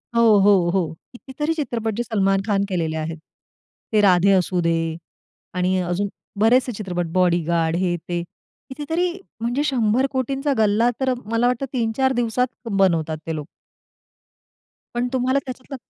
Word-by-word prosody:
हो, 235 - +4 0.2
हो, 195 -3 +4
हो. 170 -5 0 0.2
कितीतरी 295 +6 -3
चित्रपट 235 -8 -2
जे 240 - -1
सलमान 195 -4 +1
खान 200 -2 +2
केलेले 160 -3 -1
आहेत. 160 +1 -4 0.8
ते 210 - +5
राधे 190 0 +5
असू 185 -1 +2
दे 165 0 +2 0.8
आणि 180 +1 +1
अजून 180 +3 -1 0.3
बरेचसे 245 +4 +4
चित्रपट 180 -5 -3
बॉडीगार्ड, 170 -2 +2
हे, 180 0 0
ते. 175 0 -1 0.5
कितीतरी 320 +6 -1 0.3
म्हणजे 240 +5 0
100 250 -3 +2
कोटींचा 275 +2 -1
गल्ला 220 +2 +3
तर 260 -1 +1
मला 230 +3 +1
वाटतं 250 +2 0
3-4 255 +2 +1
दिवसात 240 +2 +1 0.2
बनवतात 165 -5 +2
ते 160 - -2
लोक. 150 -2 -5 1.5
पण 240 +1 0
तुम्हाला 260 +2 +2
त्याच्यातलं 255 +2 -7
215 Hz, 140 wpm, -22 LUFS, 180-255 Hz, 1.5 s, ते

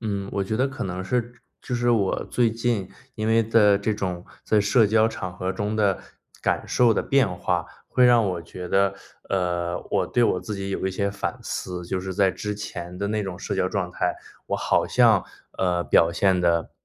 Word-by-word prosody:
嗯， 100 -3 -3
我 100 - -1
觉 110 +3 -2
得 130 +3 +2
可 135 - -5
能 95 0 -4
是 120 +3 -1 0.3
就 125 - -4
是 120 0 +1
我 105 -5 +1
最 120 -2 +2
近， 115 -4 -1 0.3
因 110 -1 -3
为 115 0 +4
在 105 -3 +5
这 105 +2 -1
种 90 -3 -4 0.2
在 105 -1 +3
社 105 +2 +4
交 110 +1 +4
场 95 -5 -6
合 95 +1 -2
中 105 +3 -2
的 100 -3 +2 0.4
感 - - 0
受 120 -2 +3
的 - - 0
变 135 -5 +3
化， - - -1 0.2
会 125 - +3
让 120 -2 +6
我 90 -3 -2
觉 90 +2 -8
得， 100 +1 +2 0.3
呃， 90 -2 -1
我 - - +1
对 120 - +1
我 90 - +1
自 100 +4 -5
己 100 0 -4
有 95 - -2
一 - - 0
些 100 +1 -1
反 100 - -4
思， 90 -1 -5
就 95 +2 -2
是 95 0 -5
在 95 0 +3
之 105 +2 -4
前 90 -4 -7
的 100 - -2
那 105 0 -1
种 95 -2 -5
社 - - -4
交 - - +1
状 - - -2
态。 - - -1 0.3
我 - - -1
好 - - +1
像， - - +4 0.3
呃， 90 -2 +1
表 85 +4 +4
现 95 -1 +2
得 85 -1 +1
100 Hz, 230 characters per minute, -24 LUFS, 90-110 Hz, 0.4 s, 让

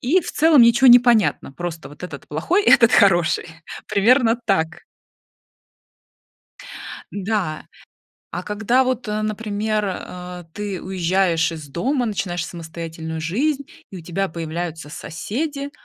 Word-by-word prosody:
и 315 +10 +3
в - - -6
целом 305 -4 +5
ничё 235 +3 +5
не 245 -1 +10
понятно: 235 - +2
просто 170 +1 -6
вот 145 - -15
этот- 145 -7 -9
плохой, 325 - +1
этот- 230 0 +6
хороший. 175 -5 +4 0.4
Примерно 230 +3 +3
так. 160 -5 0 2.3
Да. 195 -6 -2 0.7
А 180 - -4
когда 220 +6 +1
вот, 255 -2 -2
э, 210 0 -1
например, 215 0 -2
а, 180 -1 -7
ты 205 -3 -4
уезжаешь 180 -2 +1
из 155 -3 -8
дома, 245 - -1
начинаешь 175 -5 -3
самостоятельную 160 -1 -7
жизнь 270 - -1 0.3
и 190 - -8
у - - -8
тебя 185 +4 -2
появляются 165 -1 -5
соседи, 275 - -4
195 Hz, 125 wpm, -21 LUFS, 170-235 Hz, 2.3 s, не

